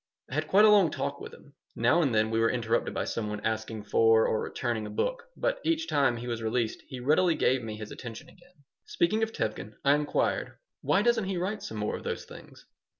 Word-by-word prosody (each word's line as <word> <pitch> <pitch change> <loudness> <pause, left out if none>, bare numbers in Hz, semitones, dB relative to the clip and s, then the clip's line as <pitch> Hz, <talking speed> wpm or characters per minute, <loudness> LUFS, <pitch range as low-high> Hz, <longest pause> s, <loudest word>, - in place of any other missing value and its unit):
I - - -6
had 155 +2 -1
quite 205 +5 +6
a - - +7
long 200 -5 +6
talk - - -4
with - - -8
him. - - -16 0.2
Now 125 +9 +3
and 140 -6 +1
then 110 0 +2
we 115 - +1
were 115 0 +3
interrupted 115 -1 0
by - - -2
some 105 -2 -3
one 105 0 -4
asking 110 0 -3
for 115 +2 +4
or 110 - 0
returning 115 -4 -3
a - - -7
book, 475 - -2
but - - 0
each 325 0 0
time 140 -5 +2
he 120 - -7
was 120 -2 -3
released 110 0 -1
he 130 - -7
readily 160 +6 +3
gave 130 0 +2
me 110 -2 -6
his 105 -1 -8
attention 120 +5 -8
again 175 -3 -22 0.2
Speaking 215 +6 0
of 225 0 0
Tevkin, 110 - -4
I 140 - +6
inquired, 150 0 -1 0.2
"Why - - +2
doesn't 235 -3 +2
he 190 -1 -2
write 195 +5 -2
some 110 - -6
more 105 0 -2
of - - -11
those - - -4
things?" - - -14
125 Hz, 230 wpm, -28 LUFS, 110-180 Hz, 0.2 s, a